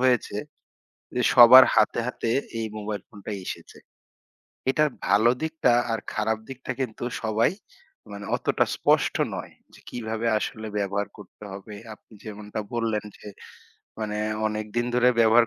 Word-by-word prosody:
হয়েছে, 125 -5 +2 0.8
যে 125 - +1
সবার 125 +1 +10
হাতে, 110 +1 +3
হাতে 120 -2 -3 0.3
এই 110 - -1
মোবাইল 105 -1 -4
ফোনটা 105 +1 -9
এসেছে। - - -8 0.9
এটার 150 +3 +3 0.2
ভালো 110 +3 +4
দিকটা 160 -5 +1 0.2
আর 115 - 0
খারাপ 110 +1 0
দিকটা 130 -1 -8
কিন্তু 120 -3 -3 0.2
সবাই 110 +6 +2 0.6
মানে 100 0 -7
অতটা - - +1
স্পষ্ট - - +2 0.2
নয়। - - -7 0.2
যে - - -16
কিভাবে 115 -1 -4
আসলে 110 0 -5
ব্যবহার 100 0 -1
করতে 105 0 -13
হবে 100 +2 -9 0.2
আপনি 110 - -27
যেমনটা 105 0 -6
বললেন 115 -2 -1
যে, - - -14 0.7
মানে 105 -1 -3 0.3
অনেকদিন 110 +2 -2
ধরে 125 0 +4
ব্যবহার 115 +1 +6
110 Hz, 135 wpm, -25 LUFS, 105-120 Hz, 0.9 s, সবার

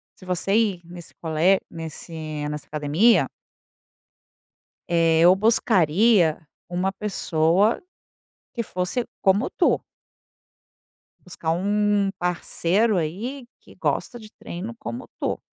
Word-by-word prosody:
se 185 - -16
você 185 +3 0
ir 205 -6 +2
nesse 175 -1 -11
cole 165 +4 +3
nesse 165 0 -8 0.4
nessa 150 -2 -6
academia 155 +10 +3 1.6
eh, 165 -2 +3
eu 180 +2 +7
buscaria 195 -4 +3 0.3
uma 180 +2 -1
pessoa 195 - +1 0.7
que 235 - -2
fosse 185 +5 -2 0.2
como 200 +4 +2
tu. - - +1 1.4
Buscar 170 -3 -3
um 205 +2 +1
parceiro 180 +4 +1
aí 225 - -4
que - - -18
gosta 240 - -2
de 215 -1 -13
treino 200 +7 -7
como 245 +2 -6
tu. - - -2
185 Hz, 105 wpm, -23 LUFS, 165-210 Hz, 1.6 s, eu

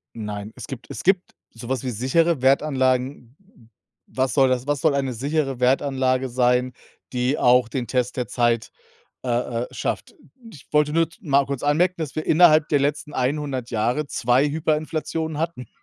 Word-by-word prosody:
Nein, 105 -1 -6
es - - -8
gibt 125 -3 -8
es - - -6
gibt 190 0 +1 0.2
so 115 0 -10
was 130 0 -2
wie 130 - -1
sichere 135 +6 +1
Wertanlagen. 130 -2 +1
W 195 - -24
w - - -27 0.5
was 130 0 +1
soll 135 -2 +5
das 130 +1 -1
was 145 -2 0
soll 155 -3 +2
eine 135 -2 -1
sichere 135 +1 -2
Wertanlage 130 0 +1
sein, 125 +1 +1 0.4
die 125 +3 0
auch 125 -1 +4
den 125 -1 -3
Test 125 0 -1
der 125 - -2
Zeit, 120 -2 0 0.5
äh, 125 - -4 0.3
äh, 125 - -4
schafft? - - -4 0.4
Ich 145 - -15
wollte 150 0 +3
nur 165 0 +2
z 225 - -21
mal 140 -6 +2
kurz 140 -1 -4
anmerken, 175 +5 +2
dass 160 -4 -5
wir 155 - -3
innerhalb 155 -2 +5
der 145 - +3
letzten 145 +1 -2
100 130 -1 -2
Jahre 120 +6 0
2 125 +2 +2
Hyperinflationen 155 0 -2
hatten. 165 -6 -4
135 Hz, 180 wpm, -23 LUFS, 125-150 Hz, 0.5 s, soll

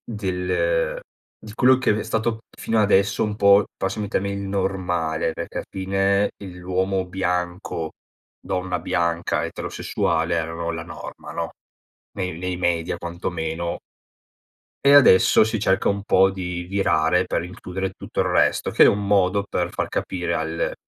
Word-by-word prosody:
del 120 - -1 0.4
di 105 - -10
quello 130 +2 +5
che 110 -5 +1
è - - -2
stato 110 0 -1 0.2
fino 115 -1 0
adesso 100 0 +3
un 105 -1 -2
po', 100 0 +5
passami 95 +3 -2
il 100 - -7
termine 100 +1 0
il 100 - -4
normale, 90 -5 -1
perché 85 - -6
al - - -4
fine 95 +1 +1
il 95 -3 -10
l'uomo 95 +1 -1
bianco, 90 -2 -2 0.5
donna 90 -1 -3
bianca 85 0 0
eterosessuale 85 +1 -1
erano 80 +1 -3
la 80 -1 -5
norma, 80 -1 -9
no? - - -3 0.7
Nei 90 -4 -3
nei 90 0 -3
media 85 -1 0
quantomeno. 85 -1 -4 1.1
E 140 - +7
adesso 115 -6 +7
si 110 0 -1
cerca 95 -2 +2
un 100 0 -1
po' 95 -2 +4
di 90 -2 -4
virare 90 -2 +1
per - - -1
includere 95 +1 -5
tutto - - -7
il - - 0
resto, - - +2
che - - +6
è - - +8
un 100 0 +1
modo 100 0 +2
per 90 -3 -2
far - - -2
capire 90 -2 -2
al 80 +1 -2
95 Hz, 150 wpm, -23 LUFS, 85-100 Hz, 1.1 s, è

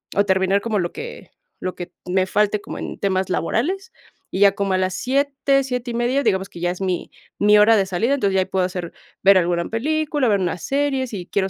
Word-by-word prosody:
o 200 - +3
terminar 190 +1 +2
como 220 -2 -1
lo 175 -1 -2
que 475 +1 -9 0.3
lo 185 - -3
que 175 0 -7 0.2
me 185 +1 +2
falte 210 +2 +1
como - - -8
en - - -6
temas 190 -1 0
laborales. 360 - -1 0.4
Y 190 - -3
ya 200 -1 +6
como 200 -1 -1
a - - +2
las 185 0 0
7 275 +1 +1
7:30 250 0 -1
digamos 190 -3 0
que 175 - -11
ya 175 +1 0
es 180 +2 -8
mi 185 -2 -2 0.3
mi 210 +1 +5
hora 210 +2 +6
de 200 -3 +2
salida. 195 +8 0
Entonces, 200 -8 0
ya 190 - +4
ahí - - -1
puedo 190 -1 0
hacer 180 -2 -5 0.3
ver 195 0 +7
alguna 170 -1 +1
película, 295 +3 0
ver 205 -3 +3
una 180 -2 -1
serie, 275 - -1
sí 195 -7 -7
quiero 195 -1 0
200 Hz, 220 wpm, -21 LUFS, 185-250 Hz, 0.4 s, ver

